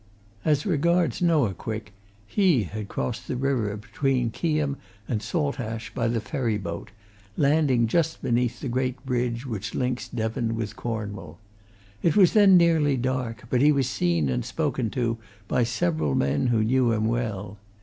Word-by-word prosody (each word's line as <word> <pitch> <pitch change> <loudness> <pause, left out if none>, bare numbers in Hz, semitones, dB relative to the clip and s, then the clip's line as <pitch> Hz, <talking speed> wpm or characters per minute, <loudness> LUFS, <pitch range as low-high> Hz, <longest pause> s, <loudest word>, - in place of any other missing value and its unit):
As 150 -2 +2
regards 170 0 +1
Noah 155 - +3
Quick 110 +1 -6 0.3
he 170 - +3
had 105 +2 -6
crossed 120 +3 -4
the - - -2
river 125 -6 0
between 125 +2 -1
Keyham 150 -1 -1 0.3
and 110 -3 -1
Saltash 115 -3 -3
by 115 - 0
the 115 0 0
ferry 115 -2 -1
boat, 85 -4 -6 0.5
landing 140 -4 +3
just 160 +7 0
beneath 120 0 0
the 140 - -3
great 130 +1 -2
bridge 125 -1 -1
which 110 -5 -4
links 125 -1 -1
Devon 115 0 -2
with 110 -1 -4
Cornwall. 100 -8 -5 0.6
It 165 - +2
was 190 -4 +6
then 200 -3 +7
nearly 160 -5 +3
dark, 125 -2 -2
but 125 - +3
he 150 +2 +6
was 140 -3 +1
seen 85 - +1
and 60 -2 -1
spoken 120 -4 -1
to 115 -1 -1 0.3
by 120 - +2
several 85 - 0
men 70 - +1
who 115 -3 +2
knew 125 +1 +3
him 110 0 0
well. 105 -4 -2
120 Hz, 160 wpm, -25 LUFS, 110-140 Hz, 0.6 s, then